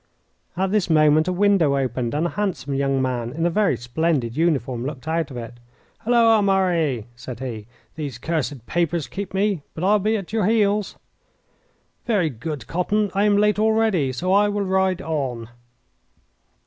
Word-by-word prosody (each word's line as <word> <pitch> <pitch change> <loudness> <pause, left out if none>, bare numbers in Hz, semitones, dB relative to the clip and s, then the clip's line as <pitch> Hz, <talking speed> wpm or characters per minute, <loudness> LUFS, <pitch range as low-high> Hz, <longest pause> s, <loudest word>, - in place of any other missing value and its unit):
At 190 +1 0
this 210 -4 +1
moment 155 0 +4
a - - +1
window 180 -7 +3
opened, 125 -1 -2
and 155 +3 0
a 175 - -1
handsome 190 -9 -2
young 135 0 0
man 120 -2 -2
in 165 +5 -2
a 175 - +2
very 195 - +2
splendid 120 0 -1
uniform 135 -7 0
looked 140 +1 -6
out 165 0 -1
of 130 - -8
it. 120 0 -8 0.4
"Halloa, 230 -2 +4
Murray!" 175 - +1
said 120 -1 -8
he. 115 -5 -6 0.3
"These 145 -7 -5
cursed 145 -3 -3
papers 170 -2 -1
keep 190 +10 -6
me, 195 -3 0
but 165 - -5
I 195 - +3
will 210 - +4
be 215 +3 +1
at 195 0 -8
your 215 -4 +1
heels." 210 -2 +1 1.1
"Very 190 -9 +1
good, 140 +5 -6
Cotton. 200 +4 0
I 200 +1 +2
am 205 -1 +3
late 210 0 +2
already, 220 -10 +2
so 180 +9 -1
I 205 +1 +4
will 205 -1 -1
ride 190 0 +1
on." 130 -8 -3
165 Hz, 175 wpm, -22 LUFS, 135-200 Hz, 1.1 s, moment